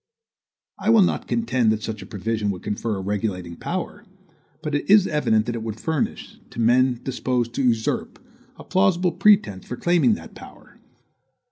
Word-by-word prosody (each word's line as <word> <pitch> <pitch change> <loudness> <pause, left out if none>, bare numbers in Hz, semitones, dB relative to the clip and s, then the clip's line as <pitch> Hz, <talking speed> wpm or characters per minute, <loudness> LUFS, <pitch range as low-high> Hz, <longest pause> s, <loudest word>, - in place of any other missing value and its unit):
I 215 - -1
will 225 -3 +7
not - - -1
contend 130 - +1
that 110 0 -2
such 110 -2 -5
a - - -10
provision 110 0 -2
would 95 -3 -4
confer 105 +1 -2
a - - -4
regulating 95 -3 -3
power; 185 - -5 0.6
but 150 - -3
it 145 0 -2
is 205 -1 +7
evident 110 - +1
that 120 - -3
it 115 - -4
would 110 -1 -5
furnish, 160 -4 -3
to - - -9
men 125 +2 +3
disposed 125 -2 -2
to 135 - -1
usurp, 115 -3 0 0.4
a - - -11
plausible 185 -2 +2
pretense 170 - +3
for 125 - -5
claiming 175 +6 +3
that - - -11
power. - - -15
120 Hz, 170 wpm, -23 LUFS, 110-175 Hz, 0.6 s, will